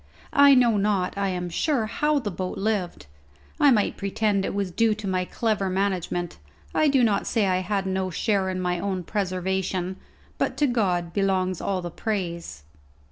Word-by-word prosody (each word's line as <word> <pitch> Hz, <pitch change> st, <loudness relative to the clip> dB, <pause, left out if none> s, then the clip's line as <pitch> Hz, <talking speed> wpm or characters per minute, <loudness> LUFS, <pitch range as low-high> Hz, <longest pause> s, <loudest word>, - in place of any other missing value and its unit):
I 280 Hz, -1 st, +7 dB
know 240 Hz, -4 st, +4 dB
not, 200 Hz, -2 st, 0 dB
I 200 Hz, -1 st, 0 dB
am 180 Hz, -1 st, -3 dB
sure, 235 Hz, -, 0 dB
how 300 Hz, +5 st, +1 dB
the 230 Hz, -7 st, -2 dB
boat 185 Hz, +1 st, -4 dB
lived. 195 Hz, -, -2 dB, 0.5 s
I 290 Hz, -, +6 dB
might 215 Hz, -6 st, +2 dB
pretend 200 Hz, 0 st, 0 dB
it -, -, -2 dB
was 200 Hz, -2 st, -1 dB
due 225 Hz, +3 st, +2 dB
to 215 Hz, -1 st, -6 dB
my 185 Hz, -1 st, 0 dB
clever 210 Hz, -2 st, -1 dB
management 185 Hz, -2 st, -2 dB, 0.3 s
I 310 Hz, -, +3 dB
do 275 Hz, -3 st, +4 dB
not 210 Hz, -4 st, +1 dB
say 225 Hz, -4 st, +1 dB
I 185 Hz, -1 st, +2 dB
had 195 Hz, +1 st, -1 dB
no 190 Hz, 0 st, -1 dB
share 195 Hz, +1 st, 0 dB
in 185 Hz, 0 st, -3 dB
my 180 Hz, -1 st, -1 dB
own 190 Hz, -1 st, -2 dB
preservation, 185 Hz, -1 st, -2 dB, 0.4 s
but -, -, -1 dB
to 295 Hz, -, +3 dB
God 185 Hz, -9 st, 0 dB
belongs 185 Hz, -2 st, 0 dB
all 190 Hz, -2 st, -2 dB
the 175 Hz, -, -5 dB
praise. 170 Hz, -, -4 dB
195 Hz, 180 wpm, -25 LUFS, 185-215 Hz, 0.5 s, I